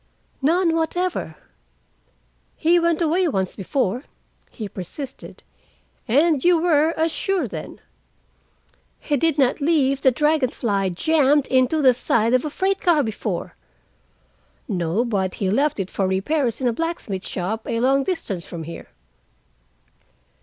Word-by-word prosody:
"None 330 +4 +2
whatever." 350 +3 -2 1.2
"He 340 +2 +3
went 335 0 +1
away 345 +3 +2
once 190 - -1
before," 240 +4 -2 0.4
he 215 -4 -7
persisted. 255 - -8 0.6
"And 290 +4 +3
you 350 -1 +4
were 320 -1 +2
as 320 +1 +1
sure 390 +3 -1
then." - - -8 1.2
"He 295 - -1
did 320 +2 +1
not 270 +1 +2
leave 280 -3 +2
the 265 - +5
Dragon 300 0 +1
Fly 200 -6 -1
jammed 290 - +2
into 260 +4 +2
the 260 -1 +6
side 230 -1 +1
of 255 - +3
a 305 - -2
freight 385 +5 -1
car 335 -5 +3
before." 220 -3 -4 1.1
"No, 185 +2 0
but 195 -5 -1
he 190 -2 -1
left 280 +3 +1
it 190 -1 -3
for 195 - 0
repairs 230 +7 0
in 260 - 0
a 240 - +1
blacksmith 225 - -4
shop, 210 +5 -4
a 230 - -1
long 270 +3 +3
distance 265 - -3
from 165 -1 -7
here. 165 +2 -9
270 Hz, 140 wpm, -22 LUFS, 215-320 Hz, 1.2 s, the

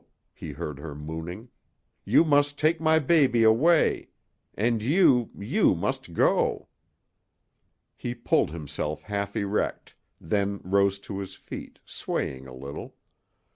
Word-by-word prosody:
he - - -8
heard 75 -2 -6
her 75 -1 -7
mooning. 80 +8 -7 0.6
"You - - +5
must 145 -1 +2
take 155 +1 +2
my 160 0 +4
baby 135 -6 +3
away. 145 +10 +4 0.5
And 115 +1 +1
you 130 - +4
you 100 - +2
must - - -3
go!" - - +1 1.3
He 120 0 -5
pulled 120 - +1
himself 75 -1 -5
half 100 0 -3
erect, 105 -1 -2 0.3
then 100 +3 -1
rose 100 +1 +2
to 100 0 -6
his 95 -1 -6
feet, - - -9
swaying 65 0 -4
a 65 - -10
little. 70 +2 -8
100 Hz, 125 wpm, -26 LUFS, 80-130 Hz, 1.3 s, You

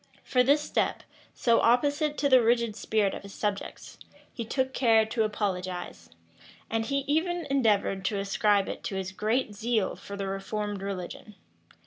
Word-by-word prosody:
For 250 -2 +2
this 285 +4 +4
step, - - -1 0.3
so 235 -2 +3
opposite 290 +5 +2
to 285 - +2
the 260 -2 +6
rigid 235 -1 +2
spirit 215 -2 0
of - - -6
his 200 0 -11
subjects, 205 -1 -4 0.3
he 235 - -4
took 260 +3 -1
care 225 -4 +4
to 225 +1 -2
apologize; 185 - -3 0.6
and 225 0 0
he 275 0 -1
even 335 +4 0
endeavored 210 -7 +2
to 205 - 0
ascribe 200 0 +2
it - - -6
to 195 - -3
his 190 -1 -3
great 220 +3 -1
zeal 220 -1 0
for 200 - -9
the 200 - -3
reformed 200 +1 -3
religion. 195 +2 -6
220 Hz, 160 wpm, -28 LUFS, 200-255 Hz, 0.6 s, the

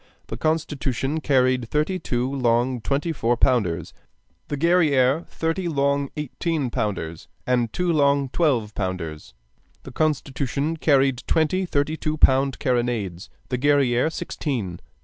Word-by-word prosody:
The - - -4
Constitution 150 -2 -1
carried 130 -4 +2
thirty 155 +5 0
two 120 -4 -1
long 125 -1 +1
twenty 140 +9 -1
four 120 -5 0
pounders, 100 - +1 0.5
the 145 - -3
Guerrière 155 -3 +3
thirty 165 +3 -2
long 140 -2 0
eighteen 150 -1 -2
pounders 85 -8 -3 0.2
and 120 -3 +1
two 180 -1 0
long 140 -2 +3
twelve 125 -10 +1
pounders; 90 -5 -5 0.5
the - - -9
Constitution 145 0 -1
carried 135 -4 +2
twenty 170 +4 +1
thirty 150 +1 0
two 155 0 -2
pound 135 -3 +4
carronades, 120 - -1 0.2
the 125 -2 -1
Guerrière 140 0 +3
sixteen. 110 - -4
135 Hz, 125 wpm, -23 LUFS, 120-155 Hz, 0.5 s, pound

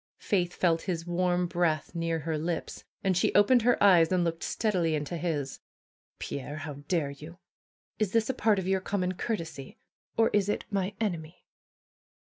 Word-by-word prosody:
Faith 180 -3 0
felt 165 -2 +2
his 165 -2 -2
warm 180 0 +1
breath 170 -3 0
near 165 -1 -1
her 160 +1 -2
lips, 165 +2 -4 0.2
and 190 -2 +2
she 180 - +2
opened 235 +5 +6
her 240 +2 +3
eyes 175 -4 +6
and 180 -1 +3
looked 165 -1 -2
steadily 180 -8 0
into 150 +3 -3
his. 155 -5 -2 0.6
Pierre! 145 +2 -5
How 155 -1 -5
dare 160 -6 0
you! 155 +5 -11 0.6
Is 210 -3 +1
this 225 0 +2
a 265 - 0
part 220 -4 +2
of 190 -1 -2
your 190 0 +1
common 185 -2 -1
courtesy? 165 - -5 0.4
Or 225 0 +4
is 205 -1 +2
it - - -1
my 195 0 -1
enemy?" 175 -6 -4
175 Hz, 170 wpm, -29 LUFS, 165-195 Hz, 0.6 s, opened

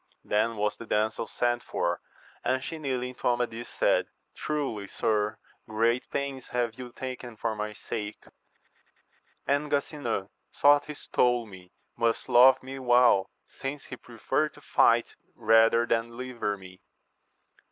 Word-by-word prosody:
Then 110 +2 +1
was 105 0 0
the 115 - -10
damsel 110 +1 0
sent 120 0 0
for, 85 0 -2 0.4
and 130 0 0
she 160 - -5
kneeling 125 -3 -2
to - - -3
Amadis, 120 -1 -1
said, - - +2 0.3
Truly, 135 -10 -3
sir, 105 +1 0 0.3
great 115 +3 +1
pains 140 -2 -3
have 120 -2 -1
you 125 -1 -9
taken 125 -2 -7
for 115 0 -2
my 105 0 -4
sake; 105 0 -6 1.2
and 145 +2 +1
Gasinan, 140 -8 -2 0.3
though 145 0 +7
he 150 - -6
stole 120 -3 +1
me, 95 -3 -13 0.2
must 115 0 0
love 125 +2 +7
me 135 +1 -7
well, 120 -6 +4 0.2
since 135 +1 -6
he - - -7
preferred - - -2
to - - -15
fight - - +3 0.2
rather 115 +1 +4
than 115 -1 +1
deliver 120 -4 -4
me. 90 -1 -14
120 Hz, 140 wpm, -28 LUFS, 110-130 Hz, 1.2 s, though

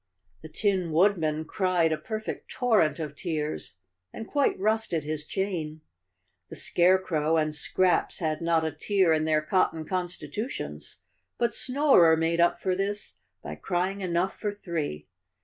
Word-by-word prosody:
The 160 - -10
Tin 185 0 0
Woodman 160 -3 +2
cried 180 -3 +1
a - - +2
perfect 220 -1 -5
torrent 215 - +2
of 150 -3 -5
tears 155 - -4 0.4
and 225 - -8
quite 285 -2 +1
rusted 215 -6 0
his 150 0 -4
chain. 165 -6 -3 0.7
The - - -8
Scarecrow 170 -3 +2
and 155 -1 0
Scraps 180 +4 +1
had 155 -2 -2
not 165 -1 +2
a 160 - -1
tear 185 +2 +2
in 155 0 +1
their 155 -1 +2
cot¬ 185 +4 +3
ton 160 -1 -7
constitutions, 185 - -4 0.4
but 235 - 0
Snorer 255 - +4
made 165 +1 +1
up 170 - +3
for 185 -1 0
this 200 +2 -3 0.2
by - - -6
cry¬ 180 +1 -1
ing 200 0 -8
enough 180 +1 -1
for 210 - -1
three. 165 - -4
175 Hz, 150 wpm, -27 LUFS, 155-195 Hz, 0.7 s, Snorer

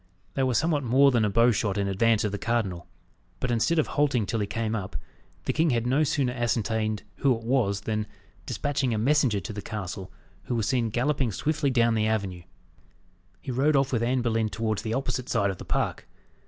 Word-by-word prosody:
They 135 - -1
were 130 -2 +1
somewhat 150 +2 +2
more 135 +3 +5
than 120 -3 +2
a 105 - +2
bow 115 +4 +4
shot 105 -3 -1
in 100 -1 0
advance 110 +3 +2
of 105 - 0
the 100 - -4
cardinal; 100 -7 -1 0.5
but 125 - -1
instead 120 +9 +2
of 155 - +3
halting 135 -7 +1
till 115 - -2
he 100 - -1
came 115 +1 -2
up, 100 -3 -5 0.5
the - - 0
king 160 +1 +2
had 120 -3 +1
no 135 +5 +3
sooner 135 -4 0
ascertained 110 -3 -1
who 130 -4 +2
it 115 - -12
was, 115 -5 +1
than, 105 0 -2 0.4
despatching 135 -4 -1
a - - -1
messenger 130 -2 +2
to 100 - -6
the 105 - -5
castle, 95 -3 -6 0.3
who 125 - -2
was 110 -2 0
seen 120 -4 +1
galloping 130 +1 0
swiftly 145 +6 0
down 115 -2 +3
the 110 -1 +1
avenue, 100 -5 -1 1.0
he 130 - -5
rode 140 +5 +2
off 135 -1 +2
with 115 - +1
Anne 125 +1 +1
Boleyn 115 -2 +1
towards 110 -2 -2
the 110 0 -2
opposite 130 -2 -2
side 100 -1 +2
of 95 - -9
the - - -8
park. - - -2
115 Hz, 210 wpm, -27 LUFS, 105-130 Hz, 1.0 s, more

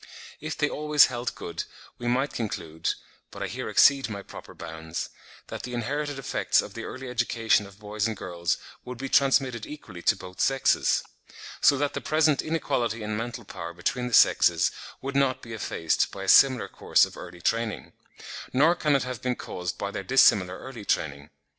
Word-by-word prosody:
If 155 +1 -5
they 150 - +2
always 150 0 +4
held 120 +1 -3
good, 85 - -5 0.4
we 120 - -4
might 130 +4 +1
conclude 80 -8 -3 0.3
(but - - -7
I - - -1
here - - -5
exceed 140 -3 +5
my 100 -2 -6
proper - - -11
bounds) 80 0 -6 0.4
that - - -7
the 125 0 -5
inherited 145 +4 -2
effects 135 - +1
of - - -3
the - - -6
early 130 0 -7
education 115 -3 +1
of 100 0 -16
boys 105 +1 -2
and 110 -2 -4
girls 85 -2 -2 0.3
would 125 -1 -7
be 135 +2 -5
transmitted 135 -4 +2
equally 110 -12 -9
to 105 - +3
both 90 -1 -8
sexes; 135 0 +2 0.6
so 145 -2 +6
that 145 +1 0
the - - -4
present 155 -2 +2
inequality 120 -8 -1
in 105 0 -3
mental 120 +1 -5
power 85 -2 -7
between 125 +8 -2
the 125 - +2
sexes - - +5 0.3
would 135 +1 -4
not 135 -2 +2
be 115 - -8
effaced 85 -6 0
by 95 - -7
a - - -6
similar 130 +3 +6
course - - +3
of - - -12
early 85 0 -10
training; 115 +4 -2 0.6
nor 150 +6 +5
can 150 -4 +1
it 135 - +2
have 125 -2 -5
been 125 -1 -1
caused 90 -5 -5
by 100 - -3
their 100 - -5
dissimilar 95 -7 +4
early 130 -5 -9
training. 75 -6 -2
120 Hz, 185 wpm, -26 LUFS, 100-135 Hz, 0.6 s, so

